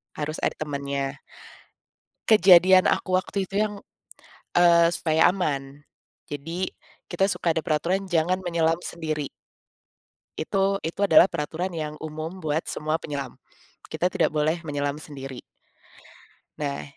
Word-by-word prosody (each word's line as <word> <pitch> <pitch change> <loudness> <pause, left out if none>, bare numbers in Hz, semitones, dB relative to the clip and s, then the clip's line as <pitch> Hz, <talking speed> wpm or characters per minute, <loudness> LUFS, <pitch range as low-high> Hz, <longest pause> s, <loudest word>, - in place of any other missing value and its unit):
Harus 155 +1 -4
ada - - +1
temennya. 140 -2 -4 1.1
Kejadian 185 -2 +7
aku 185 -1 +2
waktu 195 +1 -2
itu 195 - -8
yang, 210 -1 -2 0.8
eee, 170 -1 +6
supaya 160 -1 +3
aman, 145 -6 -3 0.5
jadi, 165 +6 -4 0.4
kita 190 +3 +2
suka 170 - 0
ada 160 - -1
peraturan 180 +5 -1
jangan 175 +2 +1
menyelam 165 -2 +1
sendiri. 155 -5 -4 1.1
Itu 195 +4 0
itu 165 +4 -5
adalah 195 -2 +7
peraturan 170 +2 -3
yang 155 -1 -4
umum 155 +4 -6
buat 155 0 -1
semua 155 +1 -2
penyelam. 145 -2 -5 0.5
Kita 180 - 0
tidak 175 -4 +1
boleh 155 +3 0
menyelam 145 -2 -2
sendiri. 135 -4 -9 1.2
Nah, 140 -1 -3
160 Hz, 120 wpm, -25 LUFS, 150-180 Hz, 1.2 s, Kejadian